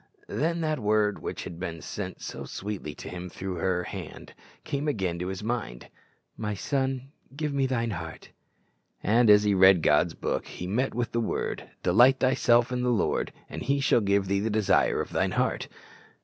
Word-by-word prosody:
Then 165 +3 0
that 155 -2 0
word 105 -1 +2
which - - -5
had 85 - -8
been 85 -3 -4
sent 95 0 -6
so - - -6
sweetly 95 -7 -5
to - - -9
him 90 0 -6
through 95 0 -5
her 90 +1 0
hand - - -8 0.3
came 140 +2 -2
again 95 - -1
to 90 - -3
his 95 +2 -5
mind, 110 - -4 0.5
"My 105 -1 -3
son, 135 +3 -2 0.2
give 150 -1 -2
me 135 -1 +1
thine 115 -3 -1
heart;" 80 -3 -7 0.7
and 115 +2 +4
as 105 0 +7
he 105 -1 +3
read 95 -3 +6
God's 75 +3 +3
Book, - - -2
he 90 - -7
met 110 +9 -1
with 120 -1 -1
the 115 - 0
word, 115 - -3
"Delight 120 +9 +5
thyself 120 -2 +3
in 125 0 -1
the 125 - +1
Lord, 120 -4 +1 0.2
and - - -7
he 140 +2 +1
shall 135 -3 +3
give 100 -1 +2
thee 100 +1 +1
the 110 +3 -1
desire 110 -2 +2
of - - -6
thine - - 0
heart." - - 0
105 Hz, 190 wpm, -27 LUFS, 95-125 Hz, 0.7 s, as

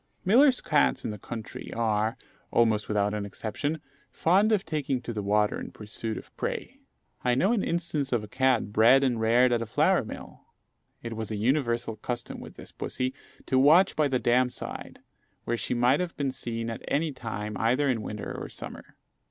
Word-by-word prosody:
Millers' 255 +7 +5
cats 150 -1 +2
in - - -1
the 105 - -7
country 110 +2 -7
are, 110 +1 0 0.3
almost 110 -3 +2
without 105 -1 +1
exception, 105 +9 -3 0.3
fond 195 +6 +3
of 205 -3 +2
taking 140 -4 -1
to 120 -1 -6
the 105 - -3
water 105 +1 +1
in - - -6
pursuit 110 +1 -6
of - - -11
prey. - - -4 0.4
I 125 -1 +2
know 185 - +3
an 225 - +1
instance 160 -5 -1
of 120 -4 +1
a - - -7
cat 125 -2 +1
bred 120 +6 +6
and 120 -4 +1
reared 120 +3 +4
at 120 -1 +2
a 115 - -3
flour - - +3
mill: - - -9 0.6
it 115 -1 -5
was 110 -1 -4
a 110 - -3
universal 120 -1 0
custom 120 +2 -5
with - - -10
this - - -12
pussy 130 +1 -3 0.3
to 130 - +2
watch 155 +8 +6
by 150 -1 +3
the 135 -2 +1
dam 125 +1 +3
side, - - -7 0.4
where 120 - -1
she 120 - -2
might 125 +4 +3
have 180 -2 -3
been 140 -2 0
seen 115 -2 -4
at 115 - -6
any 155 +2 0
time 105 -5 -5
either 125 +6 +2
in 125 -5 +1
winter 105 0 -5
or - - -6
summer. - - -9
120 Hz, 190 wpm, -27 LUFS, 110-140 Hz, 0.6 s, bred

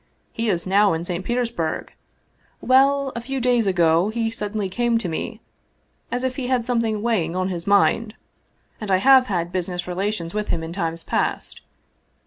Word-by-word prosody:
" - - -43
He 230 0 -1
is 175 -4 0
now 200 0 +4
in 165 +1 -3
St. 175 0 -3
Petersburg. 235 -8 -2 0.7
Well, 275 +1 +3
a 235 - -3
few 270 +3 -4
days 245 -3 +2
ago 170 0 +3
he 225 0 -1
sud 210 -2 -4
denly 205 -3 -2
came 240 +2 +1
to 225 - -3
me 160 - -4 0.7
as 245 +1 -2
if 255 -1 -2
he 260 -3 -3
had 250 -2 +1
something 230 -4 0
weighing 185 -8 0
on 185 0 0
his 175 -1 -5
mind. 210 +2 +3 0.7
And 210 - -5
I 190 - +4
have 260 +5 +6
had 175 -4 -2
business 180 -1 -3
relations 180 -1 -3
with 210 0 -2
him 165 - -1
in 165 +1 -6
times 165 -3 -3
past. - - -2
210 Hz, 185 wpm, -22 LUFS, 180-240 Hz, 0.7 s, have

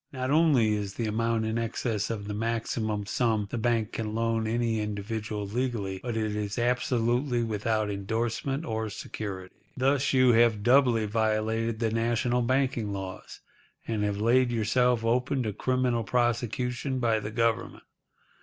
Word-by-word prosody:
Not 130 -1 -3
only 145 -9 +4
is 100 -2 -3
the 115 - -2
amount 115 +1 0
in 110 +1 -1
excess 110 -2 -2
of 105 -3 -4
the 105 - -3
maximum 110 -1 -2
sum 110 -1 0
the 120 - -2
bank 115 -2 0
can 110 -1 -4
loan 115 -1 0
any 115 0 0
individual 105 0 -4
legally, 105 -4 -2
but 120 -2 -3
it 110 -1 -1
is 105 -1 -3
absolutely 120 +1 +1
without 110 -1 -1
endorsement 115 +8 -2
or 110 -4 -2
security. 100 -3 -6 0.2
Thus 135 +2 +2
you 130 -2 +5
have 115 -3 +4
doubly 120 -2 +4
violated 110 +1 0
the 115 -1 0
national 120 +2 +1
banking 125 -3 0
laws, 95 -1 -7 0.5
and 110 -2 -1
have 105 -1 -1
laid 120 +3 +3
yourself 120 +1 +2
open 125 +3 +1
to 105 -2 -2
criminal 125 0 0
prosecution 125 +3 -1
by 115 -3 +2
the 105 - -5
Government. 115 +1 -1
115 Hz, 150 wpm, -28 LUFS, 110-120 Hz, 0.5 s, you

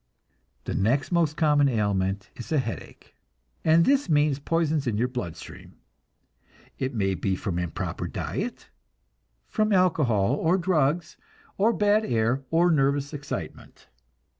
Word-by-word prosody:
The - - -4
next 120 - +1
most 165 -3 +1
common 150 -3 +3
ailment 100 -4 -1
is 120 - -9
a 155 - +2
headache, 120 -4 -5 0.5
and 160 +1 +5
this 280 -5 +2
means 145 -2 +2
poisons 155 -2 0
in 110 -3 0
your 120 +3 +1
blood 125 -10 -5
stream. - - -12 1.0
It 130 -1 -2
may 95 -3 +1
be 95 +1 -1
from 90 -1 -3
improper 85 -2 -4
diet, - - -5 0.8
from 215 0 0
alcohol, 140 - +2
or 165 +5 +2
drugs, 170 -3 0 0.4
or 215 +4 +3
bad 210 0 +2
air, 120 - 0
or 170 +2 +3
nervous 140 -1 +1
excitement. 145 -1 -7
145 Hz, 135 wpm, -26 LUFS, 115-165 Hz, 1.0 s, and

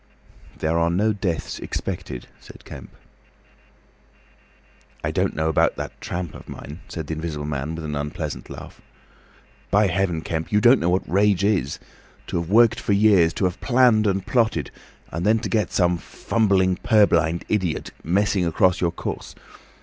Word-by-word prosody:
"There 80 +1 0
are 85 0 +2
no 105 +6 +1
deaths 95 -5 -3
expected," 65 -2 -5
said - - -15
Kemp. - - -10 2.1
"I - - -1
don't - - 0
know 80 +1 0
about 80 - +2
that - - -7
tramp 85 -3 -4
of - - -12
mine," 75 +4 -9
said 80 -3 -6
the 80 - -4
Invisible 80 -2 -4
Man, 75 +2 -3
with 80 -1 -6
an 75 - -4
unpleasant 75 +1 -5
laugh. - - -10 0.9
"By 105 +1 +4
Heaven, 90 -3 0
Kemp, 80 0 -4
you 105 - +4
don't 120 +5 +6
know 85 - +1
what 90 +2 0
rage 100 +2 +2
is!... 95 -10 +1 0.5
To - - -2
have 85 - -7
worked 115 +2 +5
for 100 - 0
years, 100 -5 +5
to 95 - 0
have 90 0 -2
planned 120 -4 +4
and 95 -1 0
plotted, 110 - +1 0.4
and 85 +2 -3
then 110 +3 +4
to - - -4
get 110 -3 0
some 90 -2 +2
fumbling 95 0 +1
purblind 85 -7 +3
idiot 95 -6 -1
messing 95 +2 +1
across 90 +2 +2
your 85 -2 +2
course! - - -6
90 Hz, 165 wpm, -23 LUFS, 80-105 Hz, 2.1 s, don't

